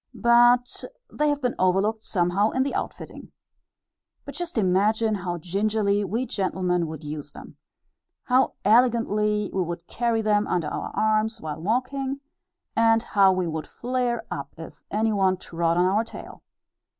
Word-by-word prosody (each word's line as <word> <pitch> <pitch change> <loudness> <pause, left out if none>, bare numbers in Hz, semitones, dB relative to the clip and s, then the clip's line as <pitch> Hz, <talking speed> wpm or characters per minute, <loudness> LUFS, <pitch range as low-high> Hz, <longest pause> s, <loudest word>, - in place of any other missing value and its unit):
But 240 +1 +4 0.3
they 300 0 +1
have 290 -1 -1
been 245 - +1
overlooked 195 +4 +2
somehow 190 +1 +1
in 260 - 0
the 275 - -3
outfitting. - - -6 0.9
But - - -8
just 350 -5 -5
imagine 215 +3 +2
how 175 -3 -3
gingerly 200 +4 0
we 225 +7 -2
gentlemen 185 -5 -1
would 155 -1 -8
use 150 0 -7
them! - - -12 0.7
How 260 0 +2
elegantly 210 -2 +2
we 190 - 0
would 170 -1 -4
carry 230 +1 -1
them 210 -1 +2
under 170 -4 -1
our - - -4
arms 220 +1 +1
while 155 0 -6
walking, 260 +7 -1 0.6
and 225 0 +4
how 195 -4 +4
we 185 -1 0
would 160 -1 -4
flare 245 -1 -2
up 140 0 -6
if 165 - -11
any 220 +1 0
one 190 -2 +2
trod 170 -1 -1
on 180 - +4
our 200 +4 +2
tail! 225 - -11
210 Hz, 150 wpm, -25 LUFS, 180-235 Hz, 0.9 s, But